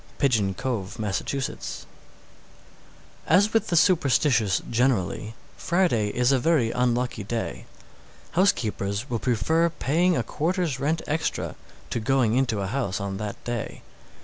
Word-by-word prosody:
Pigeon 110 Hz, -8 st, +2 dB
Cove, 110 Hz, -3 st, -3 dB
Mass. 105 Hz, -4 st, -1 dB
617. 135 Hz, -2 st, -4 dB, 1.4 s
As 195 Hz, +7 st, +4 dB
with 225 Hz, -1 st, +2 dB
the 175 Hz, -, 0 dB
superstitious 135 Hz, -, +3 dB
generally, 115 Hz, -3 st, 0 dB, 0.2 s
Friday 170 Hz, -, +1 dB
is 125 Hz, +5 st, +1 dB
a 135 Hz, -, +3 dB
very 130 Hz, -5 st, +2 dB
unlucky 125 Hz, -2 st, 0 dB
day. 100 Hz, -, -4 dB, 0.6 s
Housekeepers 120 Hz, -, 0 dB
will 115 Hz, -, 0 dB
prefer 160 Hz, +8 st, +2 dB
paying 170 Hz, +3 st, +1 dB
a 120 Hz, -, 0 dB
quarter's 160 Hz, -, -1 dB
rent 155 Hz, +4 st, 0 dB
extra 155 Hz, +2 st, -2 dB, 0.4 s
to -, -, -1 dB
going 120 Hz, -1 st, +2 dB
into 120 Hz, -6 st, +1 dB
a -, -, -2 dB
house 105 Hz, -2 st, -2 dB
on 100 Hz, -1 st, -4 dB
that 105 Hz, 0 st, -6 dB
day. 120 Hz, -2 st, -4 dB
125 Hz, 130 wpm, -25 LUFS, 110-155 Hz, 1.4 s, As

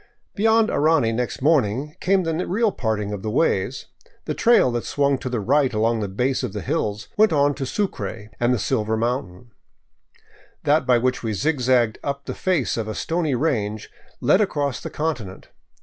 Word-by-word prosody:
Beyond 225 Hz, +1 st, +3 dB
Arani 145 Hz, -7 st, +2 dB
next 125 Hz, +2 st, -3 dB
morning 140 Hz, -1 st, +1 dB
came 195 Hz, 0 st, +2 dB
the 165 Hz, +2 st, -2 dB
real 215 Hz, +3 st, +1 dB
parting 105 Hz, -, -2 dB
of 100 Hz, -, -5 dB
the 110 Hz, -, -3 dB
ways. 105 Hz, -6 st, 0 dB, 0.4 s
The -, -, -2 dB
trail 230 Hz, -, +4 dB
that 120 Hz, -1 st, -2 dB
swung 140 Hz, -2 st, +1 dB
to 130 Hz, -, -4 dB
the 120 Hz, -2 st, -2 dB
right 135 Hz, +5 st, +2 dB
along 115 Hz, +1 st, +1 dB
the 105 Hz, -, -2 dB
base 125 Hz, +8 st, -1 dB
of 125 Hz, -7 st, -4 dB
the -, -, -4 dB
hills 105 Hz, -9 st, -2 dB
went 215 Hz, 0 st, +5 dB
on 145 Hz, -1 st, +3 dB
to 135 Hz, -1 st, -4 dB
Sucre 110 Hz, -, -4 dB
and 120 Hz, +1 st, +2 dB
the 125 Hz, -, +2 dB
silver 110 Hz, 0 st, -1 dB
mountain; 115 Hz, -2 st, -3 dB, 1.1 s
that 150 Hz, +1 st, +2 dB
by 125 Hz, -1 st, +5 dB
which 125 Hz, +2 st, 0 dB
we 110 Hz, -2 st, -2 dB
zigzagged 125 Hz, -3 st, +1 dB
up 140 Hz, -1 st, -4 dB
the -, -, -4 dB
face 180 Hz, -12 st, 0 dB
of 110 Hz, -2 st, -2 dB
a 110 Hz, -, -4 dB
stony 165 Hz, -4 st, -1 dB
range 110 Hz, -7 st, -2 dB, 0.3 s
led 200 Hz, -, +3 dB
across 145 Hz, -, -1 dB
the -, -, -5 dB
continent. 125 Hz, -12 st, -4 dB
130 Hz, 180 wpm, -22 LUFS, 110-155 Hz, 1.1 s, went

